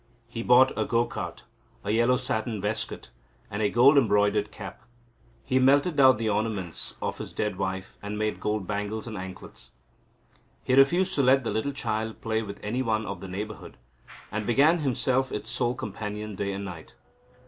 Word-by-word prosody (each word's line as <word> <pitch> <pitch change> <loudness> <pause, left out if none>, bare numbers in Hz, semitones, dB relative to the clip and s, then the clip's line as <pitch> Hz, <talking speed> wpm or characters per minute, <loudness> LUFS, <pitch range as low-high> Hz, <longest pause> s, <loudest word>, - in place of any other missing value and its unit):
He 115 -1 -5
bought 125 +2 +6
a - - +1
go 120 0 +1
cart, - - -6 0.4
a 100 - -1
yellow 120 +3 +3
satin 120 -4 -2
waistcoat, 105 - -4 0.4
and 105 +1 -3
a 105 - +3
gold 135 +6 +6
embroidered 105 -2 +2
cap. 100 +1 -9 0.6
He 130 -1 +1
melted 140 +6 +4
down 130 -3 +6
the 110 0 -2
ornaments 105 -5 -2
of - - -3
his - - -7
dead 105 -3 -2
wife, 95 0 -4
and 105 +1 -5
made 110 0 -1
gold 105 -2 -1
bangles 105 +2 -3
and 115 -2 -6
anklets. 95 -1 -9 0.9
He 130 - 0
refused 175 +8 +4
to 145 - +2
let 135 0 +4
the - - -2
little 110 +6 -1
child 110 -4 -3
play 110 0 -1
with 100 -2 -7
any 120 +5 -1
one 110 -3 0
of 95 -3 -6
the 95 - -7
neighbourhood, 105 +4 -7 0.5
and 110 0 -3
became 145 +8 +4
himself 130 -2 0
its 105 +2 -4
sole 120 -1 0
companion 105 0 -5
day 100 +1 -2
and 100 +1 -4
night. 85 -5 -9
110 Hz, 180 wpm, -27 LUFS, 105-125 Hz, 0.9 s, bought